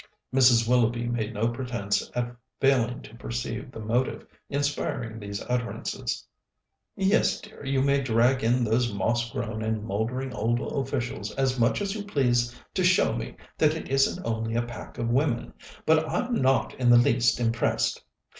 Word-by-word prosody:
Mrs. 125 -3 +5
Willoughby 120 -1 +2
made 115 -2 -1
no 110 +3 +1
pretence 120 -4 -2
at 120 0 -2 0.2
failing 130 -2 +2
to 105 - -13
perceive 120 +2 -4
the - - -9
motive 115 +4 -1 0.2
inspiring 140 -5 -2
these 100 -1 -5
utterances. 125 -1 -3 0.7
"Yes, 195 +2 +2
dear, 215 -7 -13
you 135 -1 +1
may 140 0 +3
drag 125 +1 +2
in 120 +2 +3
those 115 +1 +1
moss 115 +4 0
grown 115 -3 -4
and 110 -1 -1
mouldering 115 +5 -2
old 115 +3 0
officials 135 -3 -3
as 130 -1 0
much 115 - +2
as 195 -1 -2
you 210 -1 -4
please 120 -9 +1 0.2
to - - 0
show - - +4
me - - -5 0.2
that 155 0 +4
it 160 - -6
isn't 135 0 +2
only 115 0 -2
a 120 - +2
pack 120 -2 -9
of 115 - -1
women, 130 -2 0 0.3
but 160 0 +3
I'm 250 0 -1
not 130 - +2
in 125 -1 +3
the 120 - +8
least 120 +1 +3
impressed. 115 -1 0
120 Hz, 165 wpm, -27 LUFS, 115-135 Hz, 0.7 s, the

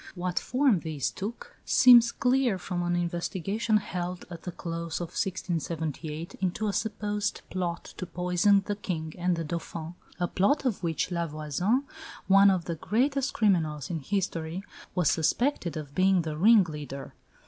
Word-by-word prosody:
What 180 0 -1
form 255 -7 +2
these 155 -4 -2
took 215 +5 -7
seems 240 -2 +7
clear 250 -5 +2
from 180 -1 -3
an 175 0 0
investigation 185 +5 0
held 180 -3 -4
at 170 -1 -7
the 180 - -5
close 170 -1 -4
of 175 -2 -4
1678 165 -4 -3
into 190 +3 0
a 205 - -1
supposed 210 -1 -2
plot 175 -2 -3
to 185 - -5
poison 180 +3 +2
the 205 - -2
King 160 -6 -4
and 180 0 0
the 165 - -3
Dauphin 165 0 -5 0.3
a 175 - +1
plot 270 - +1
of 240 -6 0
which 170 +1 -1
La 170 -1 -1
Voisin, 155 - 0 0.4
one 195 +1 +7
of 185 -4 +1
the 170 - -2
greatest 265 - 0
criminals 160 - +1
in 165 - -2
history, 175 0 -2 0.3
was 180 -5 +3
suspected 170 - 0
of 145 -2 -7
being 185 0 +3
the 155 -1 -4
ringleader. 155 - +2
180 Hz, 155 wpm, -28 LUFS, 165-205 Hz, 0.4 s, seems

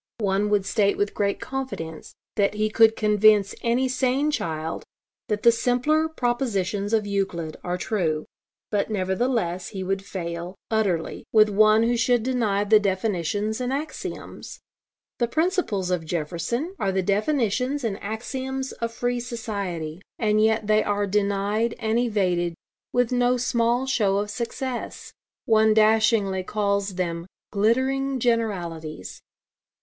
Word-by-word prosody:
One 205 -1 0
would 205 -2 +2
state 200 0 +2
with 205 0 0
great 200 -1 0
confidence 210 - -6 0.2
that 205 0 +1
he 215 0 0
could 225 0 +5
convince 210 -1 +4
any 240 +3 +1
sane 260 +3 +1
child 160 - -3 0.4
that 210 -3 -2
the 235 - +8
simpler 250 +7 +1
propositions 220 - -1
of 220 -2 +2
Euclid 190 -6 -2
are 180 0 -2
true; 165 -6 -1 0.5
but 205 0 0
nevertheless 190 -2 -1
he 190 -3 -5
would 195 +1 -2
fail, 175 -1 -5 0.2
utterly, 200 -7 0
with 215 -1 +6
one 215 +2 +5
who 240 +1 +2
should 240 0 +2
deny 225 -6 +1
the 215 +1 +5
definitions 205 +2 -1
and 250 0 -1
axioms. 300 +3 -6 0.6
The 240 - +2
principles 310 - 0
of 180 -2 0
Jefferson 175 - -2
are 195 - +1
the 190 0 0
definitions 250 - 0
and 210 -4 -2
axioms 260 +5 -4
of 230 0 -4
free 245 +1 -1
society. 200 - -4 0.2
And 215 -1 +2
yet 220 0 +2
they 215 0 +3
are 205 0 0
denied 205 +3 0
and 225 0 0
evaded, 180 -7 0 0.4
with 245 -1 +1
no 245 0 +2
small 240 0 +1
show 210 -7 +1
of 205 +1 -2
success. 240 +3 -5 0.3
One 220 -1 +4
dashingly 215 -3 +3
calls 200 0 -1
them 170 -1 -3 0.2
'glittering 260 +6 +1
generalities.' 175 - -2
215 Hz, 135 wpm, -24 LUFS, 195-240 Hz, 0.6 s, the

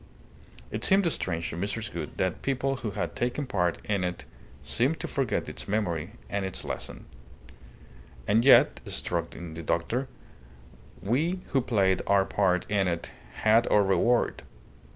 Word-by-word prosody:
It - - -4
seemed 195 0 +5
strange 85 - -2
to - - -5
Mrs. 105 +4 -3
Gould 80 -3 -6
that 95 -1 -1
people 135 0 0
who 115 -3 -4
had 100 - -3
taken 125 +4 -1
part 90 -8 0
in 100 -3 0
it 90 -1 -3 0.4
seemed 140 +7 +1
to - - -3
forget 135 -5 -1
its - - -6
memory 95 -3 -1
and 100 -1 -2
its 95 -1 -3
lesson. - - -6 1.2
"And 110 +3 +4
yet," 135 - +6
struck 85 -1 -2
in 85 -2 -8
the 80 - -6
doctor, 115 - -1 1.0
"we 160 - 0
who 135 - +2
played 100 -6 +2
our 100 -1 +4
part 95 -3 +1
in 100 -2 +1
it 85 -1 -3 0.3
had 110 +2 +5
our 105 - +4
reward. 115 +5 +2
100 Hz, 150 wpm, -28 LUFS, 90-125 Hz, 1.2 s, yet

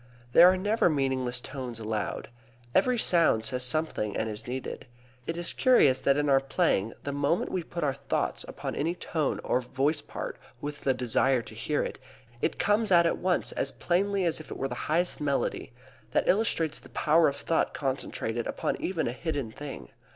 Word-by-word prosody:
There 175 - +9
are 185 - 0
never 205 +1 +2
meaningless 130 -4 0
tones 125 -3 -6
allowed. 110 -1 -3 0.4
Every 250 -1 +3
sound 165 - +3
says 125 -1 -1
something 125 -7 0
and 110 - -1
is 105 +2 -5
needed. 130 +1 -5 0.4
It 165 - -2
is 175 0 -1
curious 150 - +5
that 140 +1 +2
in 145 0 +1
our 135 -1 +5
playing 135 - 0
the 140 - -3
moment 145 +4 0
we 185 - -1
put 170 0 -5
our 140 -2 +1
thoughts 140 0 -2
upon - - -5
any 165 +4 -1
tone 155 -5 -2
or 125 - +1
voice 135 +5 0
part - - -6 0.2
with 145 0 -6
the 135 -1 +1
desire 125 0 +2
to - - -12
hear 145 +7 -1
it, - - -5 0.4
it - - 0
comes 210 0 +1
out 170 -1 +6
at 165 - +1
once 180 0 +1
as - - -1
plainly 195 +2 0
as 165 -2 +1
if 155 - -11
it - - -6
was 135 - -2
the - - -4 0.2
highest 170 +2 +1
melody. 140 -2 -1 0.4
That - - +2
illustrates 170 -7 +2
the - - -15
power 160 +2 +3
of 140 - -1
thought 165 +3 0
concentrated 125 -4 -2
upon - - -2
even 175 -3 -1
a - - -1
hidden 140 -5 -3
thing. 145 +3 -8
145 Hz, 190 wpm, -28 LUFS, 130-170 Hz, 0.4 s, There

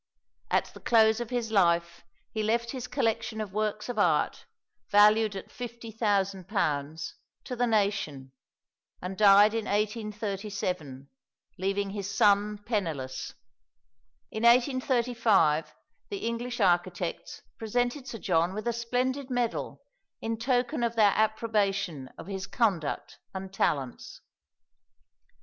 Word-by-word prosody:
At - - 0
the - - -11
close 220 -1 +4
of 240 -2 -4
his 240 -3 -2
life 170 -4 +2 0.3
he 220 - -2
left 230 +2 0
his 255 -3 -5
collection 225 0 -1
of 210 -3 -5
works 210 0 -2
of 245 -3 -3
art, 165 -6 +1 0.4
valued 210 0 +5
at 195 - -7
£50,000, 200 - -2 0.3
to 250 - -5
the 245 0 +1
nation, 200 - 0 0.7
and 185 +2 -5
died 205 +1 +7
in 225 -1 -2
1837, 200 - -3 0.5
leaving 195 +1 -1
his 200 -1 -4
son 205 0 +3
penniless. 160 - -3 1.0
In 220 - -4
1835 235 - +3 0.4
the 400 -1 -4
English 235 +1 -3
architects 175 -2 0 0.2
presented 245 +4 -1
Sir 240 - -5
John 175 -2 +1
with 215 +3 -4
a 235 - +1
splendid 250 +3 -1
medal 245 -2 -2 0.4
in 225 0 -3
token 245 0 0
of 235 0 0
their 210 -3 +5
approbation 200 - 0
of - - -9
his 195 0 -5
conduct 190 - -1 0.2
and 190 0 -6
talents. 135 -9 -2
210 Hz, 120 wpm, -28 LUFS, 190-235 Hz, 1.0 s, died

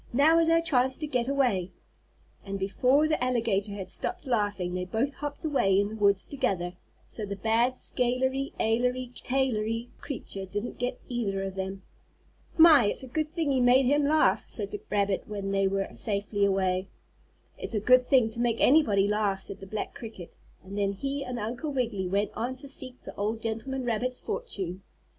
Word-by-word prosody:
"Now 305 +6 +5
is 330 0 +3
our 330 0 +4
chance 260 -5 +2
to 310 - -4
get 250 -5 -1
away." 245 -10 +1 0.7
And 195 0 -4
before 250 +10 +2
the 310 -5 0
alligator 225 -5 0
had 190 -2 -5
stopped - - -2
laughing 205 -7 0
they 180 0 -2
both 225 +10 -1
hopped 290 +3 -6
away 195 -11 +3
in 200 0 +1
the 220 - -7
woods 200 -2 +2
together, 250 -11 -1
and 175 +1 -7 0.3
so 220 - -6
the 200 -1 -4
bad 225 +5 +1
scalery 260 +3 0
ailery 250 +2 0
tailery 235 -3 -1
creature 200 -8 -5
didn't 205 +5 -5
get 245 0 -2
either 205 -6 -2
of 195 -1 -4
them. 190 0 -5 0.7
"My! 320 -7 +8
it's 205 - 0
a - - -7
good 310 +5 -1
thing 320 -3 -1
you 260 -2 +2
made 250 +2 +5
him 285 +3 +3
laugh," 310 +2 +3
said 400 - -4
the 415 - -5
rabbit 200 -2 0
when 200 -2 -4
they 195 0 +2
were 195 0 -1
safely 205 -1 0
away. 190 -1 +1 0.7
"It's - - -5
a - - +2
good 255 +5 +6
thing 250 -3 +3
to 230 - -6
make 235 -1 +1
anybody 220 -9 +4
laugh," 205 -2 0
said 200 - -5
the 195 - -10
black 215 +2 -4
cricket, 215 -7 -9 0.3
and 195 +1 -9
then 200 0 +1
he 275 +7 -3
and 250 -2 -5
Uncle 240 +7 -3
Wiggily 230 -8 -1
went 200 +3 0
on 245 +3 -3
to 275 +2 -7
seek 260 -2 -5
the - - -9
old 215 +2 -1
gentleman 240 +4 -3
rabbit's 245 +2 -1
fortune. 190 - -5
230 Hz, 190 wpm, -28 LUFS, 200-265 Hz, 0.7 s, My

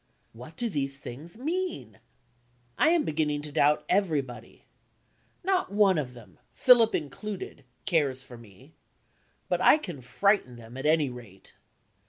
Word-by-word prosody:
What 125 +8 -12
do 240 - -2
these 140 -8 -2
things 145 - -9
mean? 355 +8 -4 0.8
I 310 - +4
am 335 -2 +3
beginning 150 - -1
to 150 - -8
doubt 145 +1 +2
everybody. 155 -10 -2 0.8
Not 375 - 0
one 200 -4 +4
of 125 -4 -5
them, 120 -3 -15 0.2
Philip 240 -3 +6
included, 185 +4 -6 0.2
cares 145 -8 +1
for 125 - -11
me 115 - -17 0.7
but - - 0
I - - +7
can 175 - -8
frighten 130 - +1
them, 115 +1 -12
at 135 +3 -2
any 155 -4 +3
rate. 115 -6 -13
150 Hz, 140 wpm, -28 LUFS, 130-205 Hz, 0.8 s, I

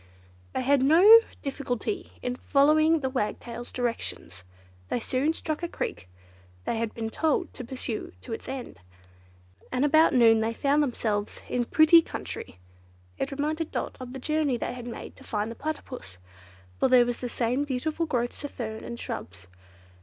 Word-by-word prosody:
They - - -1
had 275 +1 +4
no 355 +11 +9 0.2
difficulty 275 - -3
in 250 0 -1
following 310 +4 +4
the 265 - 0
Wagtail's 240 0 -3
directions. 230 - -4 0.5
They - - 0
soon 260 +6 0
struck 315 -1 -4
a 345 - -1
creek 95 - -5 0.6
they 230 - -1
had 230 -1 -3
been 225 -1 -3
told 320 +4 0
to 255 - -7
pursue 245 -3 -5
to 95 - -7
its - - -6
end, 260 - -6 0.9
and 255 +3 +2
about 310 0 +5
noon 225 -2 +6
they 225 +1 0
found 280 +5 +2
themselves 215 -6 -2
in 250 - 0
very - - -26
pretty 315 +2 +7
country. 205 - -7 0.6
It - - -1
reminded 305 +3 -2
Dot - - -3
of 255 -1 -7
the 265 - -6
journey 300 -2 0
they - - -3
had 245 -1 -8
made 235 - -8
to - - -14
find 210 +1 -2
the - - -7
Platypus, 260 - -6 0.6
for - - +4
there 250 -1 +6
were 245 - 0
the 245 +1 -5
same 245 +4 0
beautiful 305 +4 -2
growths 245 -2 -2
of 290 - -3
fern 220 -4 -6
and 235 - -7
shrubs. 90 0 -6
255 Hz, 170 wpm, -27 LUFS, 235-300 Hz, 0.9 s, no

